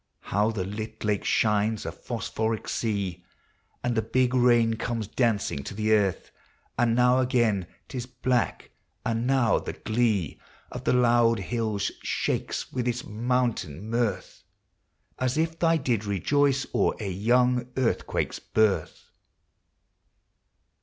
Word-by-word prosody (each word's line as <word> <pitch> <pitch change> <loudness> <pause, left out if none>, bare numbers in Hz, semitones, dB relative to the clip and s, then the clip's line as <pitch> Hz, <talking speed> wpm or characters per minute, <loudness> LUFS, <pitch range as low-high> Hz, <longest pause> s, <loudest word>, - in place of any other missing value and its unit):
How 105 +3 +1
the 110 -4 -2
lit 110 +2 -6
lake 105 -2 0
shines, 105 0 +1
a - - -3
phosphoric 110 0 -3
sea, 100 -6 -2 0.6
And 120 - 0
the 110 - +2
big 125 +3 +1
rain 120 -2 +4
comes 115 -1 -3
dancing 105 - 0
to - - -6
the 110 +1 0
earth! 100 -4 +1 0.4
And 115 -1 +2
now 125 +1 +4
again 120 -8 +1 0.2
't - - -10
is 120 - -4
black, 125 -1 -1 0.2
— - - -45
and 115 +1 0
now, 130 -4 +3
the - - -5
glee 110 - 0 0.3
Of - - -7
the - - +3
loud 120 -2 +4
hills 105 0 -2
shakes - - -2
with 125 -1 -1
its 120 0 -1
mountain 110 - -1
mirth, 115 -5 -1 0.8
As 130 +2 0
if 165 +1 0
they 165 -1 +3
did 120 -7 0
rejoice 135 - +1
o'er - - +2
a 105 - -4
young 125 +5 +2
earthquake's 130 -3 -1
birth. 110 -2 0
115 Hz, 135 wpm, -26 LUFS, 105-125 Hz, 0.8 s, rain